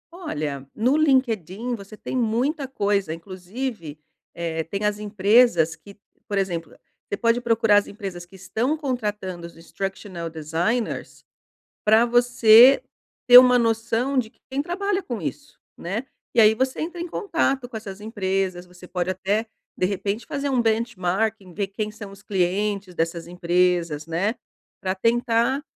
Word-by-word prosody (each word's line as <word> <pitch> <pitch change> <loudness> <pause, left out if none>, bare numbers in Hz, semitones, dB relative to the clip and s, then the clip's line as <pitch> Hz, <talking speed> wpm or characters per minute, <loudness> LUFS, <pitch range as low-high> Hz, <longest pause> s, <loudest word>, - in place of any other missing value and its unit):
Olha, 145 - -4
no 245 +6 +2
LinkedIn 245 - +1
você 210 -1 -8
tem - - -6
muita 255 +5 0
coisa, 200 -8 0
inclusive, 185 - -6 0.4
eh, 165 -1 -2
tem 200 +6 -4
as 210 0 0
empresas 205 -5 +3
que, 200 0 -16 0.3
por 205 - -2
exemplo, 170 -4 -2 0.4
você 200 - -2
pode 230 +2 +2
procurar 225 -3 +3
as 205 - +2
empresas 195 -4 -7
que 185 +2 -17
estão 220 - -1
contratando 210 - -3
os 170 - -16
instructional 185 0 -6
designers 165 +9 -3 0.6
pra 220 +2 +6
você 240 - +6 0.5
ter 245 - +12
uma 250 -1 +8
noção 230 +3 0
de 225 -4 0 0.2
quem 275 +2 -2
trabalha 390 +3 -1
com 235 -7 -5
isso, 285 - -6 0.2
né, 195 +8 -3 0.3
e 230 - +7
aí 215 0 +6
você 260 +2 -1
entra 345 +2 -4
em 345 - -3
contato 320 - -1
com 225 - -6
essas 205 -2 -9
empresas, 190 -4 -2
você 180 0 -15
pode 180 0 -2
até, 200 +4 -1 0.3
de 180 - +1
repente 200 +3 -2
fazer 285 -2 -3
um 255 -3 +2
benchmarking, 220 -3 -1
ver 200 +2 -2
quem 210 +2 -4
são 210 -2 -10
os 200 +1 -15
clientes 195 0 -1
dessas 165 0 -2
empresas, 175 -3 0
né, 175 +7 0 0.5
pra 185 0 -1
tentar 235 +5 +1
210 Hz, 150 wpm, -23 LUFS, 180-240 Hz, 0.6 s, ter